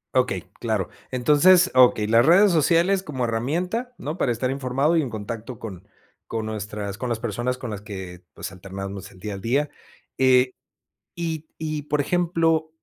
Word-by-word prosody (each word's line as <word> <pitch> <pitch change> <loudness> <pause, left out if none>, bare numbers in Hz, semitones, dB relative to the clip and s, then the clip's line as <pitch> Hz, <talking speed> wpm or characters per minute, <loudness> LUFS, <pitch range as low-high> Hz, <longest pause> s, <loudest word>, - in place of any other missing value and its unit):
Okey, - - +1 0.2
claro. - - -1 0.2
Entonces, 150 +9 +5
okey 125 -4 +5
las 115 +2 +5
redes 190 +6 +6
sociales 170 +4 +3
como 135 -9 -3
herramienta, 180 - -2
¿no?, 150 +3 -4
para 125 - +2
estar 125 +3 -1
informado 135 +4 +1
y 160 - +4
en 135 - -3
contacto 115 +2 -6
con 95 -6 -9 0.4
con 110 -1 -3
nuestras 105 -2 -5
con 125 - -3
las 115 - -1
personas 120 +3 -2
con 125 -3 -6
las 100 -1 -5
que, 95 -4 -8
pues, - - -6
alternamos 95 +1 -7
el 95 - -17
día 105 +2 -5
al 95 - -7
día. 140 +7 +1 0.5
Eh, 130 -1 +5 0.6
y 160 -2 -4
y 155 -2 -3
por 150 0 0
ejemplo 165 -1 +1
125 Hz, 170 wpm, -24 LUFS, 110-160 Hz, 0.6 s, redes